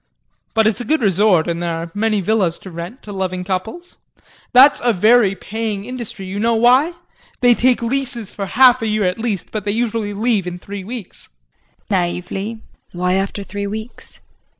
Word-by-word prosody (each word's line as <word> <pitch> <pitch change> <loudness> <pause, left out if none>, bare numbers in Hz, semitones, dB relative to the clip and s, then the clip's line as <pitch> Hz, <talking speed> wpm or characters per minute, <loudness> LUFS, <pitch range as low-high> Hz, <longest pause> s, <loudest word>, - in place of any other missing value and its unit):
But 220 -1 +4
it's 220 0 +1
a - - -3
good 310 0 0
resort, 190 -4 +3
and 170 0 -2
there 170 -1 -1
are 165 +1 -6
many 215 0 0
villas 190 -4 +1
to 190 - -8
rent 170 +9 -8
to 210 - -9
loving 185 -2 -3
couples. 210 - -5 0.5
That's 265 +3 +7
a 240 -1 +3
very 215 0 +4
paying 210 0 -4
industry. 235 -5 -7
You 190 +2 -5
know 230 +2 +2
why? 255 +8 +4 0.5
They 245 -1 +6
take 245 0 +2
leases 240 -3 -3
for 200 -1 -5
half 255 +3 +5
a 225 - -1
year 215 -1 0
at 180 +2 0
least, 220 -6 -3
but 215 -2 -3
they 205 - -3
usually 220 -1 -1
leave 215 -3 0
in 180 0 -4
three 200 +2 -8
weeks. 225 -1 -9 0.6
JULIE 190 - +3 0.2
[Naively]. 210 +5 -5 0.3
Why 180 +1 0
after 195 +1 -1
three 200 +1 -5
weeks? 220 +3 -8
210 Hz, 185 wpm, -19 LUFS, 190-235 Hz, 0.6 s, That's